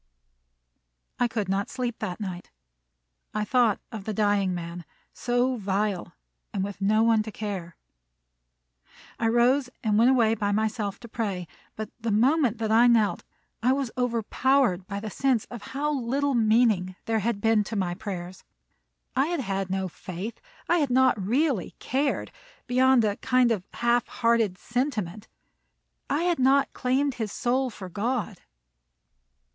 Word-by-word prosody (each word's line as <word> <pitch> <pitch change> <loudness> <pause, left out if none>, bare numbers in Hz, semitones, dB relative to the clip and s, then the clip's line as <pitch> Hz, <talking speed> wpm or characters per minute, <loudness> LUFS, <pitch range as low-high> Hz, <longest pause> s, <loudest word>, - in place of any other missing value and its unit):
I 245 - +3
could 220 -4 -2
not 195 +1 -1
sleep 245 -3 -3
that 180 - -4
night. 185 -4 -6 0.9
I 210 0 0
thought 240 -3 +3
of 215 -4 -7
the 215 - -3
dying 205 -2 +2
man, 175 0 -5 0.3
so 245 +1 0
vile, 200 -2 -1 0.4
and 190 - -2
with 200 0 -6
no 215 +3 +3
one 225 -1 +4
to 215 0 -6
care! 195 -5 -5 1.4
I 225 - +1
rose 250 +3 +3
and 215 -2 +2
went 235 +3 +6
away 235 -4 +4
by 205 -2 -1
myself 215 -1 -1
to 235 - -9
pray; 200 -6 -3 0.3
but 215 -1 -6
the 230 0 -2
moment 245 +3 +3
that 220 -1 -2
I 235 +2 +6
knelt, 225 -4 +3 0.4
I 250 +3 +3
was 270 -3 -2
overpowered 245 -4 +1
by 200 -1 -4
the 215 0 -6
sense 260 -3 +1
of 240 -3 -7 0.2
how 300 +1 0
little 275 +2 0
meaning 215 -5 +3
there 225 -1 +1
had 220 0 -1
been 225 0 +3
to 220 - -5
my 185 -3 0
prayers. 185 -2 -6 0.7
I 270 +3 +3
had 345 -4 -1
had 195 -4 -2
no 190 0 -1
faith, 185 +5 -7 0.3
and 345 - +3
I - - +2
had 290 -3 +1
not 255 -5 +3
really 250 - 0
cared, 275 +3 -1 0.3
beyond 255 -1 +4
a 205 -1 0
kind 250 -2 +3
of 200 -4 -2
half 240 0 +1
hearted 230 -5 +1
sentiment. 220 -7 -3 0.8
I 315 - +1
had 345 -3 +1
not 270 +2 +3
claimed 265 +2 +1
his 220 -4 -4
soul 255 +3 0
for 195 -4 -9
God. 215 +1 -2
225 Hz, 155 wpm, -26 LUFS, 200-250 Hz, 1.4 s, went